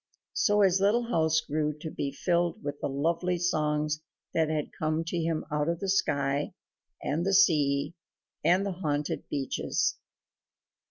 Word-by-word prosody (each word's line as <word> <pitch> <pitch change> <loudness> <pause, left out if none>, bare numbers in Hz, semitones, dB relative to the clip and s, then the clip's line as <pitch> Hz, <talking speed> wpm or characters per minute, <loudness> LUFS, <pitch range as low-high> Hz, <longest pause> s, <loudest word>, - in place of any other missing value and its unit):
So 205 0 +3
his 190 -1 +4
little 230 +4 +2
house 160 -4 +3
grew 150 0 -1
to 155 +1 -6
be 140 - -3
filled 170 +4 0
with 145 0 -5
the - - -1
lovely 170 +6 0
songs 150 -3 0 0.3
that 160 -1 +2
had 155 -2 -2
come 155 +1 -1
to 165 +1 -3
him 165 -1 -1
out 150 +1 0
of 170 0 -1
the 195 - -3
sky 145 -6 +1 0.5
and 155 +4 0
the 195 +1 +2
sea 150 -6 +3 0.5
and 185 +3 +4
the 200 - -1
haunted 150 -5 -2
beeches. 135 -2 -1
160 Hz, 155 wpm, -29 LUFS, 150-175 Hz, 0.5 s, his